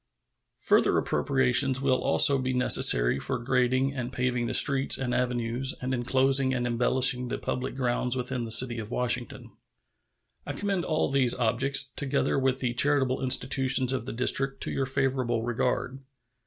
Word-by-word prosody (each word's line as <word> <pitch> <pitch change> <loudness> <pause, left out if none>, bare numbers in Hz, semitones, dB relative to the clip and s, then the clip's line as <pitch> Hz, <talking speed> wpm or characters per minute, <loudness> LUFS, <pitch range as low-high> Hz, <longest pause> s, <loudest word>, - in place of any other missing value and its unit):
Further - - +1
appropriations 130 0 +1
will 135 -1 0
also 140 -3 +3
be 130 0 -3
necessary 65 - +3
for - - -3
grading 130 +2 -1
and 125 -2 -6
paving 125 -2 -2
the - - -2
streets 140 -2 +3
and 125 -2 -4
avenues 125 +1 -3
and 130 +1 -4
inclosing 130 +1 0
and 120 -1 -3
embellishing 125 +1 +1
the - - -4
public 130 +1 -5
grounds 125 -1 -2
within 125 -1 -4
the 115 - -7
city 120 0 +5
of 110 -1 -8
Washington. 125 0 -3 0.9
I - - -7
commend 195 -4 -3
all 155 -3 -2
these 130 -3 +2
objects, 125 +4 +2
together 140 +1 -2
with 130 0 -1
the 125 -2 -2
charitable 135 0 +1
institutions 130 0 +2
of 125 -2 -5
the - - -5
District, 135 +3 -1
to - - -4
your 135 -1 -3
favorable 130 -4 -2
regard. 125 +2 -3
130 Hz, 155 wpm, -26 LUFS, 120-135 Hz, 0.9 s, city